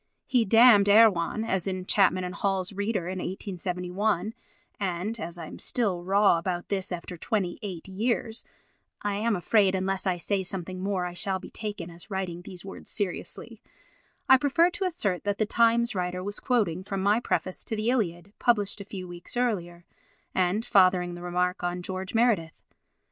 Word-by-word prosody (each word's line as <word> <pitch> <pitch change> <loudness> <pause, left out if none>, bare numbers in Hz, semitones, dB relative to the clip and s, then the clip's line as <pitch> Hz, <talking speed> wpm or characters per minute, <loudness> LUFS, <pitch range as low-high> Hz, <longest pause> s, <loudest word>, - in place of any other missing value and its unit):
He 245 -4 +2
damned 225 -1 +7
Erewhon, 210 -2 +5
as 190 -4 -1 0.2
Chapman 185 -2 +3
and 180 0 -4
Hall's 195 -1 -1
reader, 200 -3 -1
in 185 0 -3
1871, 185 +2 -2 0.5
and, 195 +3 -2
as 170 -3 -5
I 165 - -6
am - - -10
still 200 -8 0
raw 195 -1 +4
about 175 0 -3
this 195 -1 -1
after 180 0 -5
28 190 -1 -3
years, 225 +3 -1 0.6
(I 205 0 0
am 215 +2 +1
afraid 195 +1 +3
unless 190 +1 -1
I 180 -1 +1
say 195 +3 -1
something 185 0 -5
more 190 -2 -1
I 175 - -5
shall 190 +2 0
be - - -11
taken 205 -6 -5
as 170 +1 -11
writing 185 -3 -3
these 180 0 -10
words 195 - -9
seriously) 200 -4 -4 0.7
I 265 - +8
prefer 315 +6 +3
to 395 +1 -3
assert 205 - -1
that 205 0 -1
the 215 - +1
Times 235 +2 +3
writer 180 -1 -2
was 205 +1 -4
quoting 195 -8 0
from 195 0 -3
my 205 +3 +4
preface 185 -5 -2
to 220 - -2
the 215 +3 +1
Iliad, 195 -5 -2
published 210 -4 +2
a - - -8
few 190 -2 -7
weeks 175 +6 -7
earlier, 175 -8 -1 0.5
and 190 +5 +1
fathering 185 -2 +4
the 175 - -8
remark 180 +1 -1
on 175 0 -2
George 190 +4 -5
Meredith. 220 -9 +2
195 Hz, 170 wpm, -27 LUFS, 180-215 Hz, 0.7 s, I